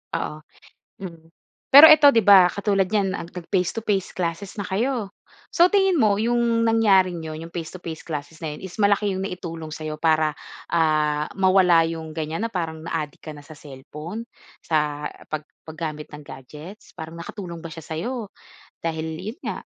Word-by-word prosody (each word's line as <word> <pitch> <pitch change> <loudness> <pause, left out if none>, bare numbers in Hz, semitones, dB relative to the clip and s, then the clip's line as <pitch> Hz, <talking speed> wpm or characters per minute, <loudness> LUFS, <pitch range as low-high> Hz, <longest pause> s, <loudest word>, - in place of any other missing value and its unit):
Oo, 150 - -4 0.6
mm. 165 -3 -10 0.4
Pero 285 +3 +11
eto 305 -2 +8
'di 230 -7 +5
ba 190 -3 +8
katulad 195 0 0
niyan, 195 -2 0
ah, - - -7
nag-face 180 +1 -2
to 225 - -3
face 195 -4 -1
classes 180 +3 -4
na 205 - -4
kayo. 210 +2 -2 0.4
So 345 +1 +5
tingin 385 -4 +2
mo 210 -4 +4
'yong 230 +1 +1
nangyaring 195 -6 +3
iyon 160 0 -7
iyong 165 - -10
face 165 0 -6
to 185 - -11
face 160 -2 -6
classes 155 0 -7
na 155 -2 -5
'yon - - -13
is 190 +2 -9
malaki 205 0 +2
'yong 190 - -3
naitulong 165 -4 -7
sa'yo 155 -1 -6
para, 155 -1 +2 0.4
ah, 155 -2 +1
mawala 185 -3 +4
'yong 160 -1 -5
ganyan 160 +7 -3
na - - -13
parang 165 -3 -3
na-adik 155 -3 -4
ka 155 -1 -8
na 145 - -12
sa 155 - -12
cellphone? 150 +9 -8 0.4
Sa 150 -2 -1 0.2
pag 155 -1 -4 0.2
paggamit 155 -1 -6
ng 150 - -11
gadgets, 150 +10 -12
parang 160 0 -8
nakatulong 170 -1 -7
ba 165 - -8
siya 160 0 -10
sa'yo, 210 - -5 0.5
dahil 160 -1 -2
'yon 215 - -7
nga, - - -4
170 Hz, 175 wpm, -23 LUFS, 160-205 Hz, 0.6 s, Pero